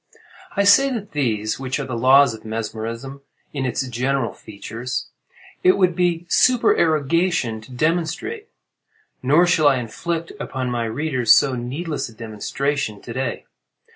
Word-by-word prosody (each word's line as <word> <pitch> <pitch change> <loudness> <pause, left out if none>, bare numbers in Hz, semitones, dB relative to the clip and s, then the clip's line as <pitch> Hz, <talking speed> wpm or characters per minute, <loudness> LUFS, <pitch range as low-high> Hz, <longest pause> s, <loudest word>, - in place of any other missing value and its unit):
I 200 - +2
say 235 +8 +6
that 210 -4 -5
these—which 130 0 -1
are 140 - -3
the 130 -2 -4
laws 130 +2 +5
of 110 - -11
mesmerism 115 +4 -5 0.3
in 135 -3 -2
its 130 +1 -2
general 125 +1 -1
features—it 120 - -4
would 180 -3 +2
be 175 -1 0
supererogation 165 - +2
to 110 - -15
demonstrate; 170 - -2 0.7
nor 150 +7 +4
shall 165 -4 +3
I 140 - +5
inflict 165 +8 -4
upon 130 -2 -3
my 120 -1 -1
readers 125 0 +2
so 135 -2 +4
needless 135 +5 -4
a - - -14
demonstration; 115 +2 -3
to 115 - -7
day. 130 -2 -3
135 Hz, 135 wpm, -21 LUFS, 115-165 Hz, 0.7 s, say